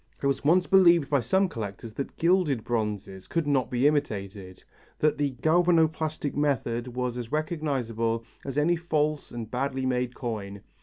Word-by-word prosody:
It - - -5
was 140 -1 0
once 175 +5 +4
believed 170 -6 +5
by 140 - +4
some 190 - +2
collectors 110 - -6
that 140 - -6
gilded 165 - +2
bronze 105 -4 -2 0.2
could 165 -2 -1
not 140 -3 +1
be 125 +2 0
imitated, 100 -10 -1 0.3
that 150 -1 +1
the 140 -3 0
galvanoplastic 160 -3 +2
method 130 -5 0
was 125 0 -3
as 120 0 -7
recognizable 130 -8 -1 0.2
as 135 0 -5
any 160 +4 +3
false 155 -3 -1
and 115 -2 -7
badly 130 +1 -2
made 125 -1 -1
coin. 100 -5 -5
135 Hz, 155 wpm, -27 LUFS, 115-155 Hz, 0.3 s, believed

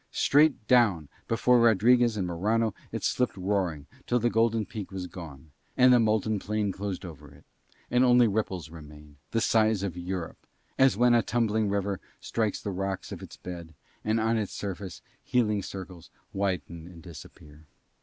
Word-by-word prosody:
Straight 145 -6 +3
down 100 - +3 0.2
before 120 +2 +3
Rodriguez 115 +1 +4
and 95 - -1
Morano 105 +6 0 0.2
it - - -5
slipped 125 -5 0
roaring, 90 -6 -1 0.2
till 120 - +2
the 120 0 +1
golden 115 -1 +2
peak 105 -2 -7
was 95 -1 -5
gone, 80 -5 -10 0.3
and 125 0 +6
the 125 - +6
molten 110 -1 +1
plain 105 0 -1
closed 100 -1 -5
over 75 -4 -11
it; 70 0 -19 0.5
and 125 +1 +4
only 125 -1 +5
ripples 95 -6 -2
remained, 75 -2 -13
the 115 - 0
size 110 -3 +2
of 95 -4 -3
Europe, 90 -1 -6 0.3
as 135 -5 +5
when 120 +1 +4
a 120 - +5
tumbling 110 -2 0
river 100 -1 -1 0.2
strikes 110 -3 -2
the 100 - -4
rocks 95 0 -4
of - - -7
its - - -11
bed 85 -3 -9 0.3
and 110 +1 +1
on 110 +1 +1
its 105 - -4
surface 95 -2 -6 0.2
heaving 105 -5 +1
circles 95 -3 -9 0.2
widen 85 -4 -3
and 85 -2 -13
disappear. 75 -2 -13
100 Hz, 165 wpm, -27 LUFS, 90-115 Hz, 0.5 s, and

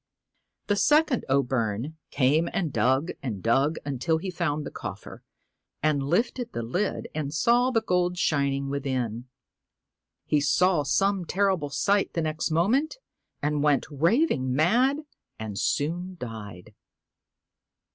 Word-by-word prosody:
The 205 - +1
second 295 +5 +3
O' 140 +1 +3
Byrne 120 +3 -2
came 145 +5 +2
and 165 -7 -1
dug 130 +8 +2
and 110 -9 -5
dug 135 +7 +2
until 145 +4 0
he 185 +3 -4
found 150 -3 -2
the - - -6
coffer, - - -8 0.6
and 155 -2 +2
lifted 230 - -1
the 120 - -3
lid 180 - -2
and 150 -2 -3
saw 235 +11 +3
the 225 -3 +1
gold 180 -3 +1
shining 140 -3 0
within. 130 -4 -2 1.0
He 150 - +2
saw 170 +4 +3
some 195 +7 +1
horrible 190 -6 +1
sight 195 +8 +1
the 165 - -1
next 155 +1 -1
moment, 230 - +1 0.5
and 150 0 0
went 145 -2 +2
raving 160 - +2
mad 245 - +3 0.4
and 105 -2 -5
soon 175 +5 -1
died. 110 - -8
155 Hz, 130 wpm, -26 LUFS, 135-190 Hz, 1.0 s, second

